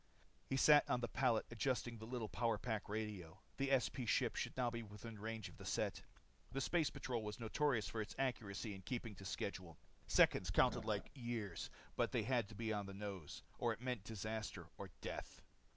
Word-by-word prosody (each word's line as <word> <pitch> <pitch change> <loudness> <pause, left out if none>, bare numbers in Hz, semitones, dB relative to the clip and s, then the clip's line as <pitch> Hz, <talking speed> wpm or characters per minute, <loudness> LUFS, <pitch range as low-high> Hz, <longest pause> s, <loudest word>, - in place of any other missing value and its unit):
He 135 - +1
sat 150 +2 +8
on 125 - +3
the 120 - 0
pallet 115 -3 +3
adjusting 120 -1 0
the 110 - -7
little 120 -2 -2
power 115 +2 +1
pack 110 -5 -2
radio. 105 -6 -3 0.2
The 140 0 +1
SP 130 -1 +3
ship - - +3
should - - -2
now 125 -2 +2
be 115 0 -3
within 105 +1 -8
range 110 -1 -3
of - - -12
the - - -9
set. - - 0 0.5
The 135 - -1
space 155 +3 +3
patrol 120 -3 -2
was 105 +1 -4
notorious 120 0 +2
for 110 - -2
its 105 - -5
accuracy 110 -5 -1
in 95 - -8
keeping 115 +2 -3
to 95 0 -10
schedule. 90 -4 -3 0.3
Seconds 90 - +5
counted 120 +3 +4
like 105 -2 -1
years. 120 - -3 0.4
They - - +1
had 120 -5 +2
to 110 - -9
be 110 0 -1
on 100 -1 -1
the 100 - -6
nose, 100 -6 -5 0.2
or - - +3
it - - -10
meant 125 -5 -1
disaster 110 0 -3
or - - -6
death. - - -5
110 Hz, 195 wpm, -41 LUFS, 105-125 Hz, 0.5 s, sat